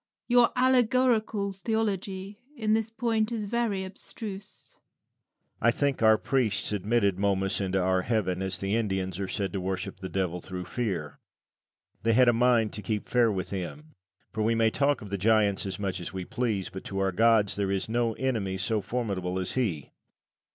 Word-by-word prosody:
Your 245 -1 +5
allegorical 245 -5 +2
theology 200 -1 -2 0.2
in 215 -2 +1
this 220 0 +1
point 225 -1 0
is 220 -3 -2
very 210 -3 -1
abstruse. 195 +1 -8
Lucian. - - -45
I 115 - +5
think 140 +2 0
our 110 -1 +6
priests 120 -8 0
admitted 100 -1 +1
Momus 95 -1 +1
into 95 0 0
our 95 0 +2
heaven, 95 -4 0
as 95 -1 -1
the 100 +2 -1
Indians 95 -5 -1
are 95 - -2
said 100 0 -3
to 95 - -2
worship 95 0 -4
the 95 -1 -6
devil, 90 -2 -2
through 90 0 -6
fear. 95 -12 -3 0.8
They 115 0 +2
had 125 +2 +5
a 120 - +6
mind 115 -2 +3
to 105 - -5
keep 105 +1 -3
fair 120 -2 +4
with 95 -2 -4
him. 145 - -6 0.4
For 110 - -2
we 115 +2 +2
may 115 -1 +3
talk 140 -2 +1
of 100 - -10
the 100 - -2
giants 105 -1 +2
as 95 -1 -4
much 95 -2 -3
as 85 - -6
we 95 -1 -5
please, 115 -6 -2
but 95 - -7
to 95 - -5
our 95 0 +1
gods 110 +1 +3
there 100 -1 -1
is 95 -1 -1
no 115 0 0
enemy 110 -7 -1
so 105 +3 0
formidable 95 -6 -2
as 95 - -2
he. 100 - -2
110 Hz, 185 wpm, -28 LUFS, 95-150 Hz, 0.8 s, our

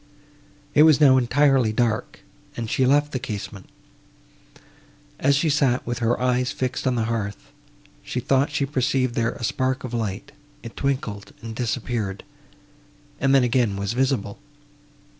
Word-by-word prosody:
It 150 - +5
was 155 -2 +6
now 135 -3 +6
entirely 130 -1 +3
dark, 115 0 -1 0.4
and 115 - -3
she 130 - +2
left 145 +2 +3
the 130 - -2
casement. 105 -5 -7 1.5
As 140 +1 +3
she 145 +4 +1
sat 140 -4 +1
with 120 -1 -3
her 120 0 +1
eyes 125 0 +1
fixed 130 +1 -3
on 130 - +1
the 115 - 0
hearth, 110 -3 -4 0.5
she 125 - -4
thought 135 +3 +1
she 145 -1 -1
perceived 130 -2 0
there 115 0 0
a - - -10
spark 130 +3 -1
of 125 -2 -6
light; 115 +4 -3 0.3
it 115 - -9
twinkled 110 -7 -3
and 115 -1 -6
disappeared, 115 -4 -3 1.0
and 135 0 +3
then 135 - +5
again 120 -4 +1
was 100 +2 -3
visible. 130 -4 -1
125 Hz, 150 wpm, -23 LUFS, 115-135 Hz, 1.5 s, was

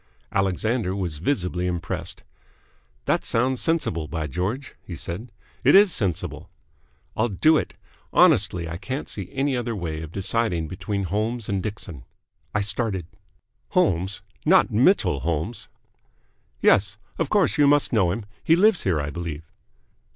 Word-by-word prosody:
Alexander 95 +2 0
was 85 -6 -3
visibly 90 - -1
impressed. 90 -1 -4 0.8
"That - - +1
sounds 125 +2 +1
sensible, 150 - 0
by 80 0 -3
George!" 95 - -3
he 85 - -7
said. 90 - -6 0.3
"It - - +6
is 200 -3 +7
sensible." 95 -6 -2 0.7
"I'll 110 - +2
do 155 - +4
it! - - -3 0.4
Honestly, 85 -2 +4
I 85 +1 -5
can't 130 +9 -4
see 100 -4 -6
any 135 0 0
other 120 -2 -2
way 80 -5 -4
of 80 -1 -8
deciding 95 -3 -1
between 100 +4 -3
Holmes 110 +5 -2
and 100 -1 -1
Dixon." 90 - -6 0.5
I 105 - +2
started. 100 -3 -1 0.7
"Holmes? 95 - +1 0.2
Not - - +4
Mitchell 70 - +3
Holmes?" 80 - -3 1.0
"Yes. 100 +1 +4 0.2
Of 160 -4 0
course 200 -6 +2
you 145 - +6
must 145 -2 +3
know 95 -6 +3
him? 105 +3 -4 0.2
He 165 - +5
lives 205 +1 +4
here, 90 -5 +1
I 70 0 -3
believe." 85 -2 -5
100 Hz, 145 wpm, -24 LUFS, 85-120 Hz, 1.0 s, is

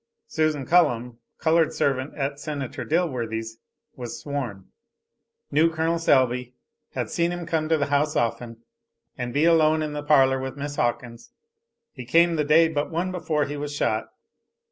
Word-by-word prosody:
Susan 155 -3 -1
Cullum, 125 -8 +2 0.2
colored 160 0 +2
servant 135 0 -1
at 140 0 -3
Senator 145 -4 -5
Dilworthy's, 115 -9 -2 0.4
was 120 -2 -7
sworn. 125 -10 -5 0.9
Knew 155 +3 +4
Col. 165 +1 0
Selby. 125 -5 +2 0.4
Had - - -3
seen 170 0 +1
him 175 -1 -4
come 160 -1 -1
to 160 - +3
the 145 - 0
house 145 +1 0
often, 115 0 -2 0.5
and 125 -2 -4
be 145 +6 +2
alone 155 -2 +4
in 150 -1 -4
the 150 - -3
parlor 135 -3 +4
with 130 +1 -5
Miss 145 0 -5
Hawkins. 120 0 -3 0.6
He 125 - -9
came 170 +6 +4
the 150 - +1
day 160 +3 +5
but 150 -2 -2
one 175 +3 -2
before 155 -5 -1
he 145 +1 -5
was 145 0 -5
shot. 110 -5 0
145 Hz, 160 wpm, -24 LUFS, 125-160 Hz, 0.9 s, day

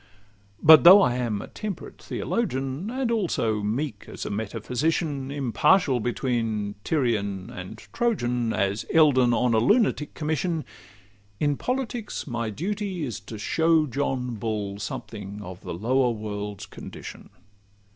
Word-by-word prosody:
But 155 0 +9
though 185 +4 +11
I 120 - +2
am 115 -5 -2
a - - -9
temperate 210 -5 -7
theologian, 140 - -2
And 255 -1 -1
also 140 - 0
meek 110 +2 -3
as - - -7
a - - -4
metaphysician, 130 +7 -2
Impartial 140 - +2
between 115 -3 -1
Tyrian 105 - -1
and 90 0 -8 0.2
Trojan, 125 - 0
As 100 0 0
Eldon 135 -6 +5
on 120 0 +2
a 110 - +4
lunatic 200 - +2
commission— 160 +1 -1 0.7
In 145 -1 +2
politics 245 - -3
my 115 -4 -3
duty 190 - -3
is 120 -6 -4
to 105 +2 -9
show 160 +8 +2
John 130 -3 -2
Bull 105 -2 -3
something 105 -1 -6
of 90 -2 -9
the - - -6
lower 125 +7 +2
world's 105 -2 -5
condition. - - -10
125 Hz, 130 wpm, -25 LUFS, 110-160 Hz, 0.7 s, though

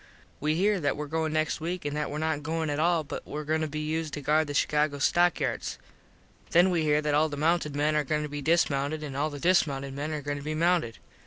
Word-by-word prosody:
We 155 +1 0
here 200 +3 +2
that 145 -4 0
were 150 - -3
going 160 +1 -1
next 155 +1 0
week 175 0 -3
an 145 - -2
that 150 0 -2
were 145 - -4
not 155 -1 -1
goin 160 0 -2
at 145 - -2
all 170 0 +2
but 145 - -6
were 150 +1 -5
goin 155 +1 0
to 155 - 0
be 155 +1 -4
used 155 0 -2
to 145 - -5
guard 155 +3 +2
the 145 - -5
Chicago 150 0 +1
stock 175 +5 +3
yards. - - -2 0.7
Then 175 +2 +5
we 170 -2 +1
here 150 -1 +2
that 150 -1 0
all 155 +2 +3
the 145 - -5
mounted 155 -1 +1
men 150 +1 +1
are 150 - +2
goin 150 +2 -1
to - - -3
be 145 0 -5
dismounted 155 -1 +1
an 140 -3 -6
all 145 +3 0
the 145 -1 -7
dismounted 140 -6 +1
men 145 +3 -4
are 150 -2 -4
goin 145 0 -2
to - - -7
be 155 +1 -3
mounted. 165 -7 +1
155 Hz, 260 wpm, -28 LUFS, 145-160 Hz, 0.7 s, Then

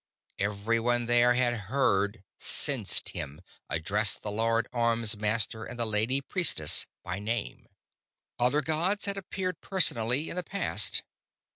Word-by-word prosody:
Everyone 115 +4 -1
there 120 +1 +3
had 120 -1 +1 0.2
heard 105 -6 0 0.2
sensed - - +2
him 70 +2 -7 0.3
address 95 +5 +3
the 105 - -6
Lord 115 +2 0
Armsmaster 115 -2 0
and 120 - -9
the 120 - 0
Lady 110 +5 +1
Priestess 140 - +2 0.2
by 90 +2 -5
name. 115 +3 -5 0.7
Other 125 +5 +1
gods 170 +7 0
had 200 -1 0
appeared 185 -1 -5
personally 135 - +2
in - - -4
the - - 0
past 200 +4 +1
115 Hz, 125 wpm, -27 LUFS, 105-140 Hz, 0.7 s, there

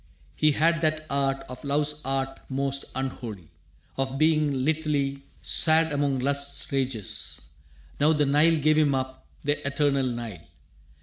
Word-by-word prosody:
He 155 -1 +3
had 165 +2 +2
that 155 -1 0
art, 135 -1 0
of 125 0 -10
love's 150 +1 0
arts 135 0 -2
most 140 0 -1
unholy, 115 - -5 0.5
Of 135 0 -2
being 155 -1 +3
lithely 145 -3 0 0.2
sad 160 -1 +4
among 140 -1 +1
lust's 140 +2 0
rages. 130 -6 0 0.6
Now 150 +2 +4
the 150 -2 +2
Nile 150 +4 +4
gave 155 +1 +3
him 145 -3 +3
up, 130 0 -5 0.2
the 145 +1 -1
eternal 140 -2 +1
Nile. 115 -8 -5
140 Hz, 135 wpm, -26 LUFS, 135-150 Hz, 0.6 s, sad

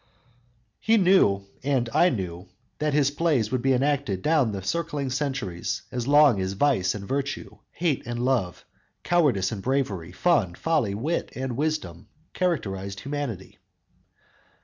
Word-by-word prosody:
He 225 +1 +3
knew, 180 - +4 0.2
and 130 -3 +1
I 170 +4 +5
knew, 90 - -4 0.3
that 150 -1 0
his 140 -2 +3
plays 145 -8 +1
would 130 - 0
be 135 +1 +3
enacted 130 -7 0
down 150 -8 +3
the 100 -2 -5
circling 145 - -2
centuries 130 - -3
as 125 0 -3
long 145 -7 +5
as 95 +1 -2
vice 100 -6 +1
and 100 -1 -7
virtue, 130 -7 -3
hate 160 -8 -1
and 120 0 -3
love, 115 -10 -1 0.4
cowardice 140 - +2
and 105 -4 -5
bravery, 105 -10 -1
fun, 100 - +1
folly, 150 - 0
wit 150 +11 -2
and 130 -1 -3
wisdom 135 - -3 0.3
characterized 100 - -2
humanity. 140 -9 -5
130 Hz, 140 wpm, -25 LUFS, 100-150 Hz, 0.4 s, I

